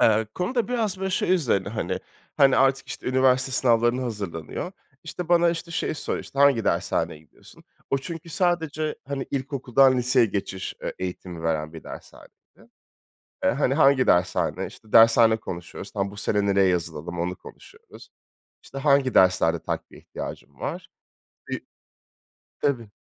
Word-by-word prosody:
Eee, 110 Hz, 0 st, +4 dB
konu 180 Hz, +8 st, -2 dB
da 240 Hz, -2 st, 0 dB
biraz, 220 Hz, -6 st, -1 dB
böyle, 190 Hz, 0 st, -2 dB
şey 185 Hz, 0 st, +1 dB
üzerine, 115 Hz, -, 0 dB
hani. 95 Hz, -4 st, -3 dB, 0.4 s
Hani, 135 Hz, -2 st, +5 dB
artık, 135 Hz, 0 st, +2 dB
işte, -, -, -7 dB
üniversite 130 Hz, 0 st, +2 dB
sınavlarına 120 Hz, 0 st, +2 dB
hazırlanıyor. 105 Hz, -, -5 dB, 0.3 s
İşte, 170 Hz, +1 st, -6 dB
bana, 170 Hz, -1 st, +4 dB
işte, 170 Hz, 0 st, -5 dB
şeyi 165 Hz, -, -2 dB
soruyor, -, -, -3 dB
"İşte, 135 Hz, -, -10 dB
hangi 140 Hz, -6 st, +5 dB
dershaneye -, -, 0 dB
gidiyorsun?" 80 Hz, -, -19 dB, 0.3 s
O 135 Hz, -, +2 dB
çünkü 165 Hz, +3 st, -8 dB
sadece, 160 Hz, -3 st, -1 dB
hani, 140 Hz, -1 st, -3 dB
ilkokuldan 135 Hz, -1 st, +2 dB
liseye 125 Hz, -1 st, +3 dB
geçiş, 95 Hz, -2 st, -4 dB
eee, -, -, -4 dB
eğitimi 90 Hz, -2 st, -6 dB
veren 80 Hz, -1 st, -1 dB
bir 80 Hz, -, -10 dB
dershaneydi. -, -, -11 dB, 1.1 s
"Eee, -, -, +4 dB
hani, 135 Hz, 0 st, +1 dB
hangi 140 Hz, -3 st, +4 dB
dershane?" 90 Hz, +1 st, +1 dB
İşte, 110 Hz, -, -16 dB
dershane 115 Hz, 0 st, +6 dB
konuşuyoruz, 90 Hz, 0 st, -8 dB
tam, 100 Hz, -1 st, -2 dB
"Bu 100 Hz, -, -12 dB
sene 105 Hz, -1 st, 0 dB
nereye 100 Hz, -1 st, +3 dB
yazılalım?" 85 Hz, -1 st, -2 dB
onu 90 Hz, +1 st, -2 dB
konuşuyoruz. 445 Hz, +3 st, -15 dB, 0.5 s
"İşte, 135 Hz, -, -9 dB
hangi 140 Hz, -2 st, +3 dB
derslerde 90 Hz, -3 st, +4 dB
takviye -, -, -5 dB
ihtiyacın -, -, -8 dB
var?" -, -, -5 dB, 0.6 s
Bi -, -, -2 dB, 1.0 s
Tabii. 120 Hz, -6 st, 0 dB
125 Hz, 150 wpm, -25 LUFS, 95-145 Hz, 1.1 s, dershane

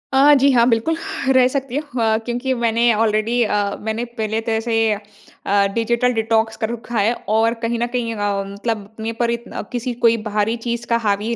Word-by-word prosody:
अ, 285 Hz, +2 st, +7 dB
जी 275 Hz, +1 st, +4 dB
हाँ, 235 Hz, -2 st, +4 dB
बिल्कुल, 230 Hz, +8 st, +1 dB, 0.4 s
रह 255 Hz, -1 st, +5 dB
सकती 265 Hz, -1 st, -3 dB
हूँ 290 Hz, -5 st, -4 dB
अ, 220 Hz, -1 st, +3 dB
क्योंकि 245 Hz, +2 st, -1 dB
मैंने 235 Hz, 0 st, +3 dB
ऑलरेडी 220 Hz, +2 st, +1 dB
अ, 205 Hz, -1 st, 0 dB
मैंने 220 Hz, +2 st, -2 dB
पहले 220 Hz, 0 st, -1 dB
तरह 225 Hz, 0 st, -1 dB
से 230 Hz, +1 st, -3 dB, 0.2 s
अ, 205 Hz, -1 st, -2 dB
डिजिटल 235 Hz, +2 st, +1 dB
डिटॉक्स 225 Hz, 0 st, 0 dB
कर 220 Hz, -2 st, -2 dB
रखा 235 Hz, 0 st, -5 dB
है 215 Hz, +3 st, +3 dB, 0.2 s
और 225 Hz, +1 st, +3 dB
कहीं 230 Hz, 0 st, -1 dB
न 240 Hz, -, 0 dB
कहीं 230 Hz, -2 st, -1 dB
अम, 200 Hz, -1 st, -2 dB
मतलब 215 Hz, +1 st, -3 dB
अपने 220 Hz, +1 st, -4 dB
पर 235 Hz, 0 st, +2 dB
इतन 235 Hz, 0 st, -5 dB
अ, -, -, -4 dB
किसी 245 Hz, 0 st, -3 dB
कोई 230 Hz, 0 st, +5 dB
बाहरी 210 Hz, +2 st, 0 dB
चीज़ 235 Hz, 0 st, -2 dB
का 235 Hz, -, +2 dB
हावी 205 Hz, +3 st, 0 dB
230 Hz, 200 wpm, -20 LUFS, 220-240 Hz, 0.4 s, अ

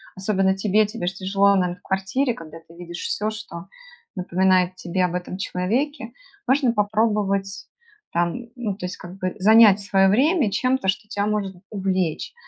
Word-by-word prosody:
особенно 190 Hz, 0 st, +1 dB
тебе, 210 Hz, +2 st, +2 dB
тебе 210 Hz, -4 st, -5 dB
ж 185 Hz, -, -1 dB
тяжело, 195 Hz, +1 st, +2 dB
наверное, 180 Hz, -2 st, 0 dB
в 180 Hz, -, -26 dB
квартире, 195 Hz, +8 st, -1 dB
когда 165 Hz, -5 st, -11 dB
ты 165 Hz, +1 st, -19 dB
видишь 175 Hz, 0 st, -8 dB
всё, 210 Hz, +1 st, -2 dB
что 215 Hz, -5 st, -8 dB, 0.5 s
напоминает 185 Hz, 0 st, +2 dB
тебе 180 Hz, +1 st, -1 dB
об 175 Hz, -, -3 dB
этом 180 Hz, +1 st, -5 dB
человеке, 230 Hz, +8 st, -2 dB, 0.3 s
можно 260 Hz, -2 st, +3 dB
попробовать, 205 Hz, -2 st, 0 dB, 0.4 s
там 170 Hz, 0 st, 0 dB, 0.2 s
ну, 220 Hz, -5 st, -3 dB
то 185 Hz, -2 st, -6 dB
есть 180 Hz, -, -7 dB
как 180 Hz, +1 st, -11 dB
бы, 185 Hz, -1 st, -3 dB
занять 215 Hz, 0 st, +7 dB
свое 195 Hz, -1 st, +3 dB
время 270 Hz, -, +3 dB
чем-то, 255 Hz, -2 st, 0 dB
что 210 Hz, +2 st, -1 dB
тя 205 Hz, -2 st, -2 dB
может 205 Hz, -3 st, -2 dB
увлечь. 190 Hz, -, -2 dB
195 Hz, 165 wpm, -23 LUFS, 185-215 Hz, 0.5 s, занять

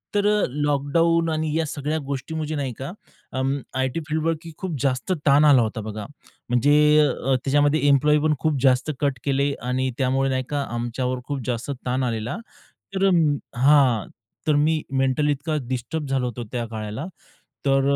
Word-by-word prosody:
तर 205 Hz, 0 st, +2 dB, 0.2 s
लॉकडाउन 150 Hz, +4 st, +1 dB
आणि 155 Hz, -1 st, -1 dB
या 165 Hz, -, +1 dB
सगळ्या 150 Hz, +2 st, -2 dB
गोष्टी 140 Hz, +3 st, -4 dB
म्हणजे 155 Hz, 0 st, -3 dB
नाही 135 Hz, -4 st, -2 dB
का 135 Hz, +5 st, -5 dB, 0.5 s
अं, 135 Hz, +1 st, 0 dB, 0.2 s
आयटी 130 Hz, +4 st, 0 dB
फील्डवर 160 Hz, +2 st, +1 dB, 0.3 s
खूप 185 Hz, -4 st, -3 dB
जास्त 135 Hz, +5 st, 0 dB
ताण 145 Hz, +2 st, +6 dB
आला 140 Hz, -4 st, +6 dB
होता 110 Hz, 0 st, -2 dB
बघा. 105 Hz, 0 st, -6 dB, 0.4 s
म्हणजे 125 Hz, +4 st, +3 dB, 0.5 s
त्याच्यामध्ये 145 Hz, +3 st, +2 dB
एम्प्लॉयी 150 Hz, +2 st, +4 dB
पण 155 Hz, -1 st, +3 dB
खूप 155 Hz, -4 st, 0 dB
जास्त 130 Hz, +3 st, +3 dB
कट 140 Hz, -3 st, 0 dB
केले 140 Hz, 0 st, +1 dB, 0.2 s
आणि 130 Hz, +1 st, 0 dB
त्यामुळे 135 Hz, +1 st, +1 dB
नाही 130 Hz, 0 st, 0 dB
का 145 Hz, -1 st, -1 dB
आमच्यावर 125 Hz, +2 st, -2 dB
खूप 140 Hz, -2 st, -3 dB
जास्त 120 Hz, +2 st, -2 dB
ताण 130 Hz, +1 st, 0 dB
आलेला. 115 Hz, -2 st, -2 dB, 0.6 s
तर 190 Hz, -, 0 dB, 0.5 s
हां 130 Hz, -4 st, +4 dB, 0.4 s
तर 150 Hz, -, +4 dB
मी 155 Hz, +2 st, +2 dB, 0.2 s
मेंटली 135 Hz, +3 st, +2 dB
इतका 150 Hz, +3 st, -2 dB
डिस्टर्ब 140 Hz, +5 st, -3 dB
झालो 135 Hz, -2 st, 0 dB
होतो 120 Hz, 0 st, -5 dB
त्या 120 Hz, -2 st, -2 dB
काळाला, 110 Hz, +4 st, -5 dB, 0.6 s
तर 135 Hz, 0 st, +4 dB
140 Hz, 155 wpm, -23 LUFS, 125-150 Hz, 0.6 s, ताण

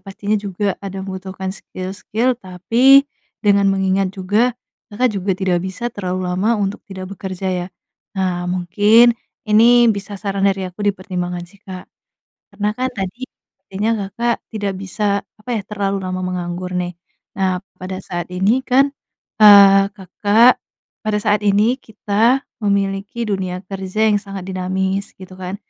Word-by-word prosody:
Pastinya 200 Hz, +2 st, -2 dB
juga 200 Hz, 0 st, -2 dB
ada 195 Hz, -1 st, -6 dB
membutuhkan 190 Hz, 0 st, -5 dB
skill-skill, 200 Hz, +6 st, -3 dB
tapi, 235 Hz, +10 st, +4 dB, 0.4 s
dengan 200 Hz, -1 st, +4 dB
mengingat 195 Hz, 0 st, +1 dB
juga 210 Hz, +6 st, +1 dB, 0.3 s
Kakak 240 Hz, +3 st, 0 dB
juga 190 Hz, 0 st, -1 dB
tidak 185 Hz, -2 st, 0 dB
bisa 190 Hz, +6 st, -4 dB
terlalu 185 Hz, -3 st, -3 dB
lama 210 Hz, +6 st, +1 dB
untuk 200 Hz, -1 st, -2 dB
tidak 190 Hz, -1 st, -7 dB
bekerja 190 Hz, -1 st, -5 dB
ya. 180 Hz, -1 st, -2 dB, 0.5 s
Nah, 180 Hz, -2 st, -1 dB
mungkin 205 Hz, +7 st, +4 dB, 0.3 s
ini 235 Hz, +3 st, +6 dB
bisa 200 Hz, 0 st, -6 dB
saran 195 Hz, 0 st, 0 dB
dari 195 Hz, -1 st, -1 dB
aku 180 Hz, +2 st, -9 dB
dipertimbangan 180 Hz, -3 st, -2 dB
sih, 190 Hz, +3 st, -21 dB
Kak. 185 Hz, -3 st, -9 dB, 0.6 s
Karena 205 Hz, 0 st, -2 dB
kan 255 Hz, +4 st, -2 dB
tadi 210 Hz, +6 st, -5 dB, 0.4 s
kayaknya 205 Hz, +4 st, -1 dB, 0.2 s
Kakak 235 Hz, +4 st, -1 dB
tidak 205 Hz, -3 st, -3 dB
bisa 200 Hz, +1 st, -1 dB, 0.2 s
apa 215 Hz, +3 st, -13 dB
ya, 225 Hz, -3 st, 0 dB
terlalu 200 Hz, -2 st, -2 dB
lama 185 Hz, -1 st, -4 dB
menganggur 180 Hz, 0 st, -4 dB
nih. 175 Hz, -1 st, -4 dB, 0.4 s
Nah 185 Hz, -1 st, 0 dB, 0.2 s
pada 185 Hz, 0 st, -5 dB
saat 175 Hz, -2 st, -6 dB
ini 200 Hz, +8 st, +1 dB
kan, 270 Hz, +2 st, +3 dB, 0.5 s
eee, 200 Hz, -1 st, +8 dB
Kakak, 210 Hz, +5 st, +3 dB, 0.4 s
pada 215 Hz, -1 st, 0 dB
saat 210 Hz, 0 st, +1 dB
ini 210 Hz, +4 st, +3 dB
kita 220 Hz, +4 st, +1 dB, 0.2 s
memiliki 200 Hz, +2 st, -1 dB
dunia 185 Hz, -3 st, -2 dB
kerja 195 Hz, +2 st, -2 dB
yang 210 Hz, -, +3 dB
sangat 195 Hz, -2 st, -8 dB
dinamis 190 Hz, +1 st, -2 dB
gitu 185 Hz, 0 st, -11 dB
kan? 185 Hz, +1 st, -4 dB
195 Hz, 140 wpm, -19 LUFS, 185-210 Hz, 0.6 s, eee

